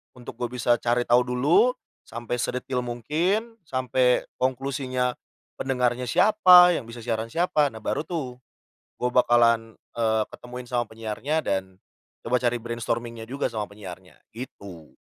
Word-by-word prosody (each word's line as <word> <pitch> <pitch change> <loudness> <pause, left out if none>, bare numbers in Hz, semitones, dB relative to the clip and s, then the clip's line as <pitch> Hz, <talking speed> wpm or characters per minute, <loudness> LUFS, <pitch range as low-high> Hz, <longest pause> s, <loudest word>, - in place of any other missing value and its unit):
untuk 120 -1 -11
gua 120 - -1
bisa 120 -1 +1
cari 120 +1 +1
tahu 125 +1 +3
dulu 145 - +3 0.3
sampai 120 +1 -4
sedetail 125 +1 -2
mungkin, 165 - -1
sampai 130 -1 +1 0.2
konklusinya, 130 -1 -1 0.5
pendengarnya 125 -1 0
siapa, 180 - +7
yang 135 -9 -2
bisa 115 0 -9
siaran 115 -1 -2
siapa, 150 +2 +1
nah 110 -5 -9
baru 155 - -2
tuh 130 -8 -4 0.6
gue 125 - 0
bakalan, 115 -2 +3 0.2
eee, 110 -1 +1
ketemuin 125 0 -10
sama 120 -1 0
penyiarnya 115 +7 -2
dan 95 -8 -3 0.4
coba 120 - -1
cari 120 0 +1
brainstorming-nya 115 0 -4
juga 130 +5 -2
sama 110 -2 -3
penyiarnya 95 -3 -11 0.2
gitu. 100 -9 -10
125 Hz, 135 wpm, -25 LUFS, 115-130 Hz, 0.6 s, siapa